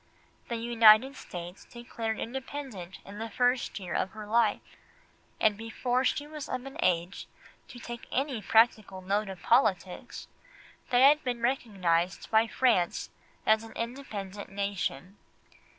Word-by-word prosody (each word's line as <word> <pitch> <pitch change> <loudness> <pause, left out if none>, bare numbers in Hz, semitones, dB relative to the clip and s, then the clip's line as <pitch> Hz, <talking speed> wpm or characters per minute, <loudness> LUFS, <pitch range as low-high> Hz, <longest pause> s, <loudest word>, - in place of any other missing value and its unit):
The 235 - -3
United 230 +2 +5
States 175 -5 -8
were 235 - -11
declared 225 -2 -3
independent 255 -7 -6
in 205 +1 -9
the 225 +1 -4
first 245 0 0
year 180 -3 -6
of 190 - -1
her 215 -1 -8
life, 220 0 +2 0.8
and 215 -1 +3
before 245 +3 -1
she 290 +2 0
was 300 -1 -8
of 255 0 -3
an 270 - -9
age 175 +1 0 0.4
to 255 - -11
take 240 0 -8
any 270 -4 -1
practical 215 -4 +2
note 200 +2 0
of 190 -2 -9
politics 195 -7 +1 0.6
they 245 0 +4
had 295 +3 +6
been 245 -2 -3
recognised 190 -8 0
by 220 +1 +4
France 225 -9 +1 0.3
as 220 0 +4
an 225 - -11
independent 215 -5 -6
nation. 195 -3 -3
225 Hz, 140 wpm, -29 LUFS, 195-245 Hz, 0.8 s, had